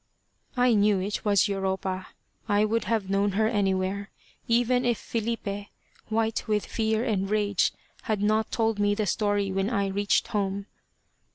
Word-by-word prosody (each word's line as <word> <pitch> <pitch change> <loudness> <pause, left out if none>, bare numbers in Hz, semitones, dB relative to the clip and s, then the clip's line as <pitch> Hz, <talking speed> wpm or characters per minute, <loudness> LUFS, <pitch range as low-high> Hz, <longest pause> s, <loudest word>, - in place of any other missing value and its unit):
I 250 -1 +4
knew 205 -2 +3
it 200 +2 -3
was 205 -1 +3
Europa. 190 -1 -2 0.4
I 205 +1 +3
would 225 +2 0
have 220 -4 0
known 200 0 +2
her 215 +2 +2
anywhere, 195 -2 0 0.4
even 245 +2 +2
if 240 -2 +1
Filipe, 215 -3 -3 0.4
white 225 0 0
with 210 -1 +1
fear 220 0 0
and 200 -6 -1
rage, 205 -2 +2 0.3
had 215 -2 0
not 215 +2 +1
told 225 -2 0
me 205 0 +2
the 215 0 0
story 205 0 0
when 195 +2 0
I 200 -5 0
reached 200 +1 +1
home. 200 -2 -1
205 Hz, 155 wpm, -27 LUFS, 195-220 Hz, 0.4 s, I